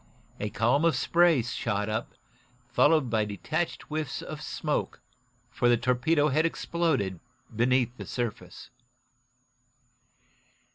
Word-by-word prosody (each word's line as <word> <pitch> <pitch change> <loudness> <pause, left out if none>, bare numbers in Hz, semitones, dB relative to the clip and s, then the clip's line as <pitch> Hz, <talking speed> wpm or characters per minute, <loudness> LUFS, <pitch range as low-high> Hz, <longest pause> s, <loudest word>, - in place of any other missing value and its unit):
A 105 - -2
column 120 +9 +2
of 165 -1 +3
spray 170 -7 +3
shot 105 -3 -2
up, 110 0 -3 0.5
followed 140 +3 +3
by 110 -2 +2
detached 155 - -3
whiffs 155 -2 -4
of - - -7
smoke, - - -3 0.5
for 120 - +2
the 120 - +5
torpedo 125 +6 +2
had 155 +3 +2
exploded 160 - -1 0.4
beneath 125 +1 +2
the - - -8
surface. 120 -3 -5
125 Hz, 110 wpm, -28 LUFS, 115-155 Hz, 0.5 s, the